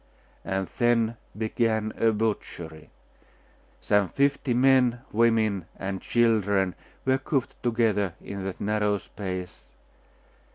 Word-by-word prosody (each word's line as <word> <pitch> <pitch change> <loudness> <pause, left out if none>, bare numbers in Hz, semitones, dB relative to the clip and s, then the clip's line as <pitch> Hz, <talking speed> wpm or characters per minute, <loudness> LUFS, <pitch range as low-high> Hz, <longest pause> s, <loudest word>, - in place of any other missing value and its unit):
And 95 -1 -2
then 120 -2 +3 0.2
began 110 -1 0
a 115 - +3
butchery.... 100 -7 -3 0.9
Some 105 -3 +2
fifty 140 -1 +1
men, 125 -1 +4
women, 110 -5 +2
and 95 -1 -4
children 100 -5 +2 0.3
were 130 0 +3
cooped 135 -1 -1
together 110 -6 +1
in 100 -1 -6
that 95 - -5
narrow 105 0 +1
space.... 90 - -7
110 Hz, 100 wpm, -26 LUFS, 95-120 Hz, 0.9 s, men